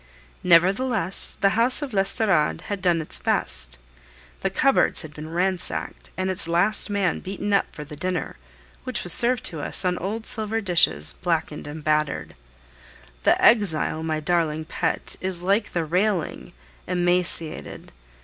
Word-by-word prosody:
Nevertheless, 190 +3 +2
the 195 - +5
house 235 +7 +2
of 270 -5 -6
l'Estorade 195 -4 +1
had 200 -2 -5
done 175 -3 +2
its - - -3
best; 60 0 -1 0.6
the - - 0
cupboards - - +2
had 155 -1 -10
been 155 +1 -8
ransacked, 180 +2 -3
and 185 0 0
its 185 -2 -3
last 175 +6 +1
man 200 -4 0
beaten 200 +2 -4
up 200 - +3
for 150 - -8
the 150 +1 -10
dinner, 180 +4 -3 0.5
which 255 -3 -2
was 175 - +5
served 245 0 +5
to 160 -3 -4
us 185 - +1
on 180 -1 0
old 220 +4 -4
silver 220 0 0
dishes, 180 -4 +2
blackened 160 -4 -2
and 150 +1 -8
battered. 150 -1 0 0.9
The - - +4
exile, 170 -8 +3
my 160 -1 -1
darling 160 -1 0
pet, - - -2
is 185 -2 -3
like 200 +4 +1
the 170 -2 -1
railing, 180 +1 -1 0.3
emaciated! 175 -2 -1
180 Hz, 150 wpm, -24 LUFS, 160-200 Hz, 0.9 s, the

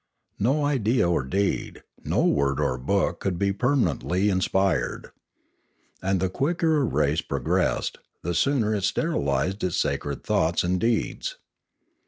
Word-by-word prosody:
No 140 +8 +2
idea 125 -7 +2
or 85 -6 +1
deed, 95 +9 -2 0.2
no - - +1
word 70 -1 +1
or 65 -1 0
book 100 +9 0
could 95 -3 -2
be 100 +1 +1
permanently 105 -5 +1
inspired. 95 -1 0 0.9
And 95 0 +1
the 95 - +1
quicker 160 - +1
a 145 - +2
race 125 - +1
pro - - -3
gressed, - - 0 0.3
the 85 - -1
sooner 110 - +2
it 100 -3 -1
sterilised 95 - 0
its 90 -2 0
sacred 70 -1 -2
thoughts 80 +2 +1
and 90 +1 0
deeds. 120 - -1
95 Hz, 140 wpm, -25 LUFS, 85-125 Hz, 0.9 s, No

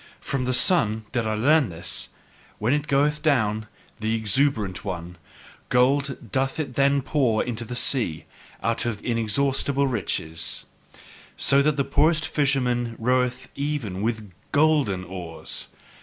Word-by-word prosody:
From 135 -2 -3
the 130 - 0
sun 110 - +6
did 120 -4 -1
I 110 - -1
learn 145 +4 +3
this, 85 +2 -3 0.5
when 110 +5 0
it 150 0 -1
goeth 145 +2 +1
down, 110 -8 +1 0.3
the 110 +1 -1
exuberant 110 -3 +1
one: 90 -2 -6 0.5
gold 130 -2 +1
doth 135 +3 -1
it 145 -5 -3
then 140 +1 +2
pour 130 -6 +1
into 120 -2 -4
the 125 +2 -6
sea, 120 - 0 0.4
out 115 +1 0
of 110 -3 -4
inexhaustible 135 +4 0
riches, 90 -10 -2 0.7
So 140 0 +4
that 150 0 +1
the 140 - +2
poorest 155 +3 +2
fisherman 125 -5 0
roweth 125 +1 0
even 140 -10 -3
with 110 -2 -3 0.2
GOLDEN 145 -11 +2
oars! 85 -2 -6
125 Hz, 135 wpm, -24 LUFS, 110-140 Hz, 0.7 s, sun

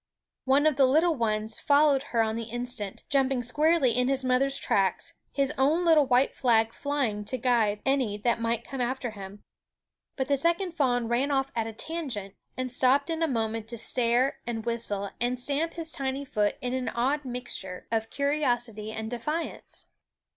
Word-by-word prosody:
One 275 +3 +3
of 305 -4 +3
the 270 -2 +5
little 320 +6 +3
ones 220 -4 -1
followed 285 -1 +3
her 230 -2 +2
on 220 0 -2
the 230 0 -4
instant, 240 -4 -3
jumping 270 -3 +1
squarely 300 +2 +3
in 250 +1 +1
his 270 -1 +1
mother's 270 +2 +2
tracks, 195 -2 0 0.2
his 275 -1 0
own 310 +6 +3
little 310 -4 +5
white 255 +1 +3
flag 225 -2 +2
flying 270 -8 -2
to 255 - -2
guide 225 -4 +1
any 260 -7 +1
that 230 +2 0
might 230 0 -1
come 270 -2 -4
after 250 0 -2
him. 200 -1 -10 0.7
But 265 -1 -2
the 280 - +3
second 340 +5 +1
fawn 245 -7 0
ran 245 +5 +1
off 270 -1 0
at 225 -1 -1
a 225 - -6
tangent, 240 - -5 0.2
and 255 -1 -3
stopped 270 +5 +3
in 325 0 -2
a 325 - +3
moment 225 -4 -2
to 235 +1 -5
stare 240 +3 +2
and 225 -2 -4
whistle 210 -4 -1
and 245 +1 0
stamp 290 +6 -1
his 325 -1 -1
tiny 270 0 -3
foot 210 -5 0
in 250 0 -2
an 255 -1 -1
odd 270 +5 0
mixture 245 -8 -4
of 225 -1 -1
curiosity 245 -7 -1
and 220 +1 -5
defiance. 300 +8 -4
250 Hz, 180 wpm, -27 LUFS, 225-280 Hz, 0.7 s, the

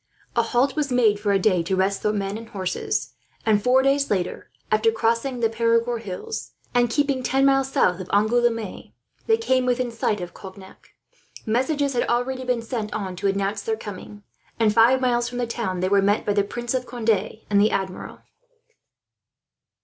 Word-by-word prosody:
A 235 - +4
halt 245 +4 +1
was 295 -3 -1
made 225 -5 +3
for 205 -1 0
a 200 - +4
day, 185 -2 +2
to 185 +3 -1
rest 195 +1 0
the 210 - +1
men 200 -1 -2
and 225 +1 -8
horses 190 -3 -3 0.3
and, 215 -2 +3
four 260 +1 +4
days 275 +1 +2
later, 185 -3 -2 0.2
after 215 +1 +3
crossing 230 +3 0
the 225 - +4
Perigord 230 +1 +1
hills, 230 - -6 0.2
and 245 -1 +3
keeping 280 +1 0
ten 270 +2 +2
miles 270 -1 +3
south 180 -7 +2
of 185 - -7
Angouleme, 230 0 0 0.3
they 445 -1 +4
came 260 - +1
within 250 -1 0
sight 225 -2 -1
of 175 -1 -7
Cognac. 190 0 -13 0.6
Messages 275 +5 0
had 240 - 0
already 255 +2 -1
been 250 -2 -1
sent 225 -3 -4
on 190 -4 -4
to 200 - -1
announce 195 +1 -1
their 220 +2 -2
coming 205 0 -9 0.4
and, 220 -2 +3
five 235 +4 +5
miles 240 -1 +1
from 245 - -7
the 245 - 0
town, 225 -6 -3
they 185 - +1
were 200 0 +4
met 205 +2 +1
by 205 - +1
the 200 -1 +2
Prince 240 +4 -4
of 255 -1 -2
Conde 220 -4 -1
and 200 0 +5
the 215 - +4
Admiral. 190 -3 -4
225 Hz, 190 wpm, -23 LUFS, 200-250 Hz, 0.6 s, five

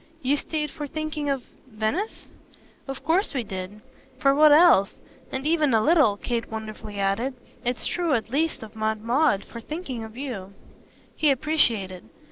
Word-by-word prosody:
"You 270 +3 +3
stayed 300 0 -3
for 295 -1 -6
thinking 310 0 -3
of 270 -3 -1 0.2
Venice?" 235 - -3 0.6
"Of 270 0 -6
course 340 +2 +1
we 255 - 0
did. 195 +1 -7 0.4
For 275 +1 +4
what 300 +1 +6
else? 300 - +6 0.4
And 265 +1 -3
even 305 -5 +3
a 220 - +3
little," 295 -10 +4
Kate 235 +2 -3
wonderfully 215 -2 -6
added 210 +7 0 0.3
"it's 245 -1 -1
true 345 -4 0
at 225 -1 -3
least 310 -1 0
of 220 0 -11
Aunt 220 0 -1
Maud 240 -3 +2
for 230 - -9
thinking 270 -4 -5
of 220 +1 -10
you." 215 -9 -5 0.6
He 305 - +3
appreciated. 235 - +1
260 Hz, 160 wpm, -25 LUFS, 220-300 Hz, 0.6 s, what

